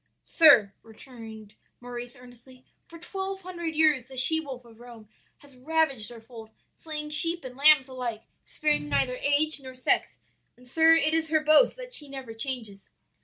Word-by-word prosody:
"'Sir,' 245 Hz, -, +5 dB
returned 220 Hz, -2 st, -13 dB, 0.3 s
Maurice 245 Hz, 0 st, -9 dB
earnestly, 250 Hz, +1 st, -17 dB, 0.2 s
'for 335 Hz, -, -13 dB
twelve 385 Hz, +2 st, -6 dB
hundred 345 Hz, -3 st, -6 dB
years 300 Hz, -6 st, +2 dB
the 265 Hz, -1 st, -13 dB
she 320 Hz, +6 st, +4 dB
wolf 265 Hz, -5 st, -9 dB
of 230 Hz, -1 st, -18 dB
Rome 235 Hz, -3 st, -14 dB, 0.3 s
has 280 Hz, -2 st, -19 dB
ravaged 270 Hz, -5 st, -1 dB
our 235 Hz, -, -11 dB
fold, 225 Hz, -1 st, -13 dB, 0.3 s
slaying 300 Hz, -1 st, -7 dB
sheep 330 Hz, +3 st, +1 dB
and 250 Hz, -1 st, -9 dB
lambs 285 Hz, -1 st, +5 dB
alike 245 Hz, -4 st, -6 dB, 0.2 s
sparing 300 Hz, -, -2 dB
neither 145 Hz, -, 0 dB
age 290 Hz, +3 st, 0 dB
nor 260 Hz, -1 st, -11 dB
sex; 255 Hz, -, -1 dB, 0.4 s
and, 250 Hz, -, -19 dB
sir, 320 Hz, +5 st, +4 dB
it 315 Hz, -1 st, +1 dB
is 320 Hz, -1 st, -1 dB
her 310 Hz, -1 st, +1 dB
boast 310 Hz, +10 st, +4 dB
that -, -, -11 dB
she 295 Hz, -9 st, -2 dB
never 265 Hz, -4 st, -9 dB
changes. 225 Hz, -5 st, -5 dB
265 Hz, 170 wpm, -26 LUFS, 240-315 Hz, 0.4 s, Sir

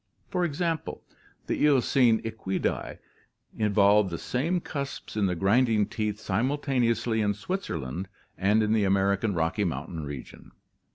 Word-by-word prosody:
For 180 Hz, -2 st, 0 dB
example, 165 Hz, 0 st, -2 dB, 0.4 s
the -, -, -1 dB
Eocene 130 Hz, -5 st, +4 dB
Equidse 110 Hz, -4 st, -3 dB, 0.6 s
evolved 105 Hz, -1 st, +4 dB
the 85 Hz, -, -4 dB
same 160 Hz, -, -1 dB
cusps 140 Hz, -8 st, -6 dB
in 105 Hz, -2 st, +2 dB
the 90 Hz, -, -1 dB
grinding 105 Hz, +3 st, +3 dB
teeth 105 Hz, -1 st, -3 dB
simul 120 Hz, +10 st, 0 dB
taneously 120 Hz, -5 st, +1 dB
in 105 Hz, -1 st, +1 dB
Switzerland 95 Hz, -, -4 dB, 0.3 s
and 105 Hz, +3 st, +2 dB
in 105 Hz, 0 st, +1 dB
the 110 Hz, -2 st, +3 dB
American 100 Hz, +1 st, +1 dB
Rocky 80 Hz, +5 st, 0 dB
Mountain 80 Hz, -1 st, -3 dB
region. 70 Hz, -3 st, -9 dB
105 Hz, 130 wpm, -27 LUFS, 95-130 Hz, 0.6 s, Eocene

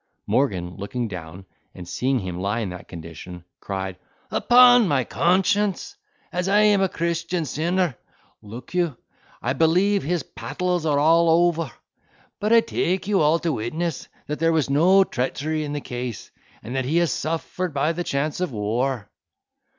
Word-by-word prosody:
Morgan, 90 Hz, -10 st, 0 dB
looking 110 Hz, +5 st, -3 dB
down, 90 Hz, -1 st, -8 dB, 0.3 s
and 90 Hz, -1 st, -9 dB
seeing 130 Hz, +6 st, 0 dB
him 90 Hz, -5 st, -4 dB
lie 100 Hz, +5 st, -1 dB
in 105 Hz, -, -3 dB
that 90 Hz, -, -9 dB
condition, 85 Hz, +1 st, -9 dB, 0.2 s
cried, 95 Hz, -1 st, -5 dB, 0.3 s
"Upon 245 Hz, -2 st, +6 dB
my 140 Hz, -6 st, +2 dB
conscience, 190 Hz, -, +1 dB, 0.4 s
as 180 Hz, +1 st, -2 dB
I 205 Hz, +1 st, +4 dB
am 210 Hz, -2 st, +4 dB
a 190 Hz, -, +2 dB
Christian 170 Hz, 0 st, -2 dB
sinner, 170 Hz, +1 st, 0 dB, 0.5 s
(look 115 Hz, -, -10 dB
you,) 170 Hz, -7 st, 0 dB, 0.5 s
I 125 Hz, -, 0 dB
believe 180 Hz, +8 st, +3 dB
his 170 Hz, +3 st, -1 dB
pattles 180 Hz, -3 st, -3 dB
are 145 Hz, -2 st, +2 dB
all 165 Hz, +3 st, +4 dB
ofer; 165 Hz, -3 st, +2 dB, 0.7 s
but 210 Hz, +2 st, -1 dB
I 230 Hz, 0 st, +7 dB
take 190 Hz, -4 st, -1 dB
you 200 Hz, -4 st, +2 dB
all 155 Hz, +2 st, +4 dB
to 165 Hz, -2 st, 0 dB
witness 155 Hz, +9 st, -3 dB, 0.2 s
that 150 Hz, -, -4 dB
there 165 Hz, 0 st, +3 dB
was 155 Hz, -4 st, +1 dB
no 180 Hz, +7 st, +5 dB
treachery 155 Hz, +2 st, -2 dB
in 145 Hz, -1 st, -4 dB
the 145 Hz, -, -3 dB
case, 125 Hz, -3 st, -6 dB, 0.3 s
and 120 Hz, -, -6 dB
that 130 Hz, -1 st, -1 dB
he 155 Hz, +6 st, +1 dB
has 170 Hz, -4 st, +2 dB
suffered 165 Hz, +3 st, -3 dB
by 145 Hz, +3 st, +1 dB
the 175 Hz, +1 st, -3 dB
chance 145 Hz, 0 st, -2 dB
of 180 Hz, -, -1 dB
war." 115 Hz, +2 st, -1 dB
155 Hz, 165 wpm, -23 LUFS, 120-175 Hz, 0.7 s, I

